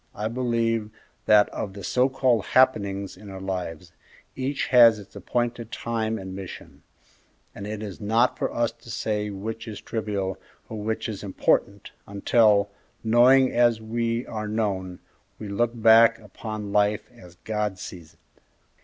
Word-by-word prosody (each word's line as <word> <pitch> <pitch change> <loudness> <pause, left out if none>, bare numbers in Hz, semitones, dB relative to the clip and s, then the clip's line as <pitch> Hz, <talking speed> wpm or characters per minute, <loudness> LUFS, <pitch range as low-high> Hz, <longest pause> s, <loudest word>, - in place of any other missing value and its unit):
I 105 +2 -2
believe 115 -3 0 0.4
that 105 -1 +6
of 100 - -5
the 100 -1 -9
so 125 +8 +2
called 125 -5 +2
'happenings' 100 -7 +2
in 100 +2 -12
our 95 -1 -8
lives, 90 -3 -5 0.4
each 135 +2 -2
has 120 -3 +7
its 105 0 -13
appointed 120 -1 -3
time 110 -1 -2
and 95 -1 -7
mission; 95 -2 -9 0.7
and 100 - -7
it 110 0 -5
is 105 0 -8
not 115 +4 +2
for - - -2
us 120 -1 0
to 115 0 -17
say 105 -2 -2
which 110 +4 -6
is 105 -2 -6
trivial 100 -4 -3 0.3
or 110 - -6
which 110 +1 -2
is 105 -3 -5
important, 100 0 0 0.2
until, 100 0 +3 0.3
knowing 125 +4 +5
as 120 -2 +3
we 115 +2 -2
are 110 -1 -5
known, 100 -4 -2 0.4
we 105 - -7
look 115 +4 -1
back 115 +1 +6
upon 105 -1 -7
life 105 0 +2
as 90 -8 -16
God 105 -3 -2
sees 85 -2 -10
it." - - -36
110 Hz, 155 wpm, -25 LUFS, 100-115 Hz, 0.7 s, has